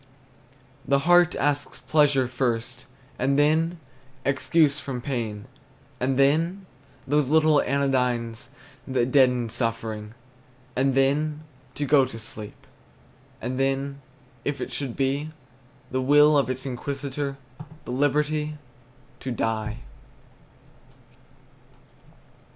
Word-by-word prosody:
The 140 -1 +2
heart 175 0 +5
asks 145 0 -1
pleasure 145 -4 +3
first, 125 0 -2 0.3
And 135 +2 +2
then, 160 +4 +2 0.5
excuse 140 +2 +2
from 135 -3 -5
pain; 115 -6 -4 0.5
And 130 +1 0
then, 165 +8 +2 0.4
those 145 0 +2
little 155 0 +4
anodynes 125 -5 0 0.4
That 130 -2 0
deaden 125 -4 +4
suffering; 115 -2 -3 0.6
And 135 +1 +2
then, 150 +3 +1 0.3
to 145 - -1
go 140 -2 +5
to 125 -3 -8
sleep; 110 -1 -10 0.7
And 125 +2 -4
then, 135 +1 -1 0.4
if 145 -1 -2
it - - -5
should 135 -5 -4
be 140 +2 -1 0.6
The 130 +1 0
will 145 +3 +6
of 140 -2 +2
its 130 +1 -4
Inquisitor, 140 +2 -4 0.5
The - - -5
liberty 150 +3 0 0.6
to 130 - -4
die. 110 -1 -2
135 Hz, 105 wpm, -25 LUFS, 125-145 Hz, 0.7 s, will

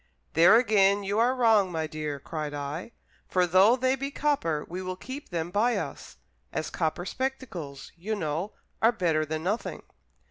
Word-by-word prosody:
"There 170 +7 +7
again 205 -4 +4
you 200 +2 0
are 245 +3 +3
wrong, 220 -6 +4
my 160 -2 -1
dear," 155 -2 -4
cried 150 +1 -5
I; 145 +9 -5 0.4
"for 180 -1 +2
though 190 +7 +5
they 260 +1 +1
be 275 +1 -4
copper, 275 - 0
we 180 +2 -5
will 185 0 -4
keep 265 +9 -8
them 170 -1 -3
by 225 +5 +2
us, - - -6 0.3
as - - -3
copper 170 0 -1
spectacles, 195 - -5
you 200 +6 -3
know, 165 +2 -3 0.3
are 225 - +6
better 165 -8 0
than 155 +1 -3
nothing." 205 +6 -2
185 Hz, 170 wpm, -27 LUFS, 160-230 Hz, 0.4 s, There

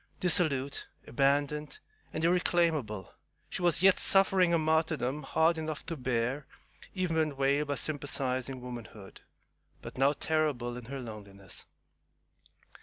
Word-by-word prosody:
Dissolute, 145 -6 +2 0.2
abandoned, 145 +3 0 0.3
and 160 - -4
irreclaimable, 165 - +1 0.4
she - - -4
was 175 0 +2
yet 195 -1 +6
suffering 190 -2 +5
a 170 - +4
martyrdom 155 -3 0
hard 160 +1 +1
enough 155 -1 -5
to 165 - -4
bear 130 +1 -2 0.5
even 180 -3 -1
when 155 -3 0
veiled 140 +2 +1
by 145 - -1
sympathizing 130 -2 -2
womanhood, 115 -5 -10 0.6
but - - -9
now 135 +2 +4
terrible 145 -6 -1
in 125 -1 -8
her 135 +3 -6
loneliness. 100 -5 -9
145 Hz, 120 wpm, -30 LUFS, 125-160 Hz, 0.6 s, yet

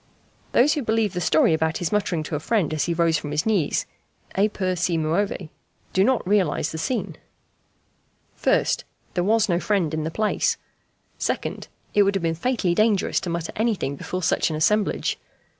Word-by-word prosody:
Those 270 +5 +5
who 295 - -1
believe 220 -4 +1
the 180 - -2
story 155 0 +4
about 160 0 0
his 175 - -2
muttering 195 -6 0
to 155 - -4
a - - -1
friend, 180 -2 0
as 155 - 0
he 170 - 0
rose 165 -2 +2
from 150 - -6
his 150 +1 -1
knees, 200 -9 +1 0.5
"e 205 +2 +3
pur 185 -3 -1
si 175 -1 0
muove," 165 +2 -1 0.4
do 190 - +4
not 255 -3 +1
realize 195 -6 +1
the 160 - -5
scene. 245 +9 -2 1.2
1st. - - +2 0.3
There 175 - 0
was 220 +3 +3
no 175 -3 +1
friend 185 -6 0
in 155 0 -1
the 160 - -2
place. 215 +5 0 0.6
2nd. - - -2 0.3
It 205 - +5
would 200 0 +3
have 195 - -1
been 165 -1 +1
fatally 190 0 0
dangerous 215 0 +2
to 180 - -5
mutter 170 -1 -3
anything 215 - 0
before 180 +6 -5
such - - +2
an 155 - -3
assemblage. 205 +7 +1
180 Hz, 185 wpm, -24 LUFS, 160-210 Hz, 1.2 s, Those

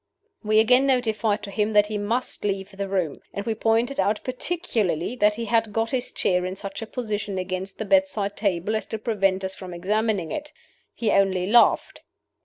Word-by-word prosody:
We 215 0 +3
again 250 +5 +5
notified 220 -5 +1
to 200 - -6
him 210 +2 0
that 210 0 +6
he 210 0 -3
must 230 +5 -2
leave 195 -1 -2
the 195 0 -4
room; 180 -7 -1 0.2
and 200 - -4
we 225 - 0
pointed 225 +4 +1
out 205 +2 +2
particularly 250 - -1
that 210 -2 +3
he 230 +1 -4
had 225 -1 +1
got 225 +2 -1
his 255 -2 0
chair 180 -1 +1
in 185 +1 -3
such 195 +1 -6
a 225 - -5
position 210 -5 -3
against 185 +1 -4
the 220 - -4
bedside 220 -7 +1
table 200 0 0
as 215 - -3
to 220 - -4
prevent 195 -4 0
us 190 0 -2
from 185 -2 -8
examining 200 -1 0
it. 300 0 -5 0.4
He 225 -3 0
only 190 -2 +2
laughed. 235 +5 +3
210 Hz, 195 wpm, -24 LUFS, 195-225 Hz, 0.4 s, that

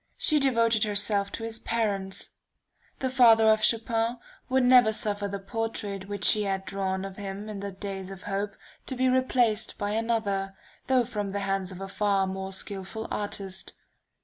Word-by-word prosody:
She 305 -2 +4
devoted 230 -5 +3
herself 205 -1 +1
to 225 - -4
his 225 0 -3
parents. 200 -4 -2 0.7
The 260 - -1
father 235 -4 +6
of 220 0 +4
Chopin 230 +1 +1 0.3
would 260 0 +3
never 250 -3 +6
suffer 205 -2 0
the 200 0 -4
portrait 200 -2 -4
which 205 0 -5
she 215 - +5
had 195 -1 -2
drawn 190 -1 -2
of 195 -1 -8
him 200 +1 -6
in 210 -2 -6
the 200 0 -5
days 195 -1 -6
of 195 -1 -9
hope, 200 0 -3 0.3
to 260 - -2
be 260 +1 +2
replaced 250 -4 +2
by 205 -1 -2
another, 210 -3 -1 0.3
though 255 -2 +3
from 205 -3 -4
the 200 - -2
hands 195 -1 -1
of 185 0 -9
a 195 - -4
far 195 0 +1
more 190 0 -4
skilful 195 +3 -3
artist. 195 -2 -3
205 Hz, 175 wpm, -27 LUFS, 195-225 Hz, 0.7 s, father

